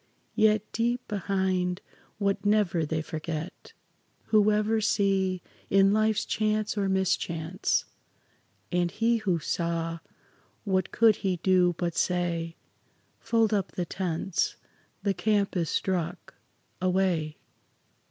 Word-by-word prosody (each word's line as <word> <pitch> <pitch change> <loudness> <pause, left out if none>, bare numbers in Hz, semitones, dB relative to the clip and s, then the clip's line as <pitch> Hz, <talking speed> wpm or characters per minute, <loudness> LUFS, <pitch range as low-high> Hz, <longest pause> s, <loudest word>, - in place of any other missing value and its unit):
Yet 215 -1 +3
deep 240 +2 -1
behind 190 -3 -1 0.4
what 200 -1 0
never 200 -6 +2
they 160 0 -1
forget, 160 +2 -6 0.6
Who 215 -1 +5
ever 215 +1 +1
see 190 -3 +1 0.3
in 195 0 +5
life's 215 0 +2
chance 215 0 0
or 200 -2 0
mischance. 185 -2 0 0.9
And 175 -1 +1
he 230 +5 +1
who 195 -6 0
saw, 165 0 -2 0.6
what 190 -3 0
could 225 -2 +4
he 185 -2 -1
do 180 -2 +4
but 170 -2 -2
say, 170 -2 -1 0.6
"Fold 225 -2 +2
up 200 -3 -1
the 180 - -2
tents; 175 0 -1 0.5
the 200 - +2
camp 200 +2 +1
is 170 -3 0
struck; 180 -1 -2 0.5
away! 180 -5 +1
190 Hz, 115 wpm, -28 LUFS, 175-210 Hz, 0.9 s, Who